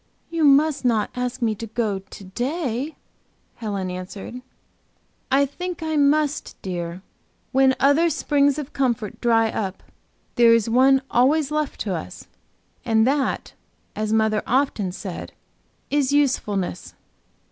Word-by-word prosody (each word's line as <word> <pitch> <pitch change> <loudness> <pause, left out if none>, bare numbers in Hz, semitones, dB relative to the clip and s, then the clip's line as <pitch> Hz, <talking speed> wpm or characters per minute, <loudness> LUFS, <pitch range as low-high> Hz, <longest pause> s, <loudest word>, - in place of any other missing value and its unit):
"You 330 -1 0
must 285 0 +4
not 225 -4 +1
ask 250 0 -3
me 225 -2 +2
to 225 +2 -7
go 215 -3 -1
to 195 +1 -13
day," 255 - -3 0.6
Helen 200 -4 -3
answered. 190 +7 -7 0.9
"I 275 +1 +4
think 355 +4 -6
I 315 -1 -1
must, 295 +1 +1
dear. 175 -1 -5 0.5
When 265 0 +4
other 285 +5 +4
springs 285 -2 +2
of 295 -2 -6
comfort 240 -6 -1
dry 225 -2 +3
up, 195 -3 -4 0.5
there 230 -1 +7
is 230 -2 +1
one 265 +3 +4
always 280 +4 +3
left 305 -1 -2
to - - -1
us. - - -6 0.6
And 220 -1 +3
that; 275 +1 0 0.4
as 215 0 -2
mother 220 -1 +2
often 245 -7 +1
said, 185 -1 -7 0.6
is 285 -2 +2
usefulness." 210 -11 0
250 Hz, 130 wpm, -23 LUFS, 215-285 Hz, 0.9 s, there